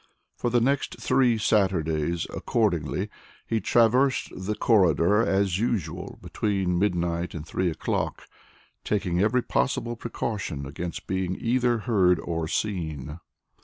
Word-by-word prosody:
For 120 - -1
the 120 +1 +3
next 140 +3 0
three 125 -3 +3
Saturdays, 85 -6 +1
accordingly, - - 0 0.4
he 110 -1 -1
traversed 120 +6 +3
the 95 +3 -3
corridor 100 -2 +4
as 95 -3 +1
usual 115 -6 -2
between 95 -4 -1
midnight 85 -3 0
and 80 -1 -6
three 90 +2 -1
o'clock, 80 - -2 0.6
taking 90 -4 0
every 115 +4 +2
possible 120 -3 -1
precaution 105 -10 -4
against 85 +5 -6
being 95 -1 -1
either 120 0 +2
heard 95 -7 +3
or 80 -2 -3
seen. 80 -7 -3
95 Hz, 120 wpm, -26 LUFS, 85-115 Hz, 0.6 s, corridor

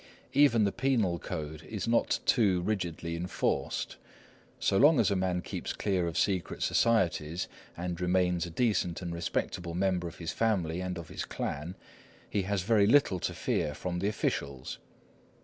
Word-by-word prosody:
Even 135 -6 +5
the 100 - +2
penal 110 -11 +1
code 80 -3 -5
is 105 +5 -5
not 115 0 +2
too 100 -7 +3
rigidly 85 -4 -2
enforced. 90 +2 -2 0.6
So - - +1
long 145 +1 +6
as 105 -4 +3
a - - +2
man 90 -1 0
keeps - - -4
clear 95 -4 0
of 85 0 -3
secret 95 -2 0
societies 90 -7 +1 0.3
and 90 0 -4
remains 90 -1 +2
a - - -7
decent 90 -3 0
and 85 -1 -3
respectable 85 0 -2
member 90 -1 +1
of 85 - -9
his 85 -2 -4
family 90 -7 0
and 90 -1 -3
of 85 -2 -8
his - - -4
clan, 85 +6 -4 0.5
he 100 - 0
has 100 -3 0
very 105 -1 +4
little 115 -7 +4
to - - -2
fear 75 - -1
from 90 +2 -3
the 100 - 0
officials. 70 -10 -2
90 Hz, 165 wpm, -30 LUFS, 85-105 Hz, 0.6 s, long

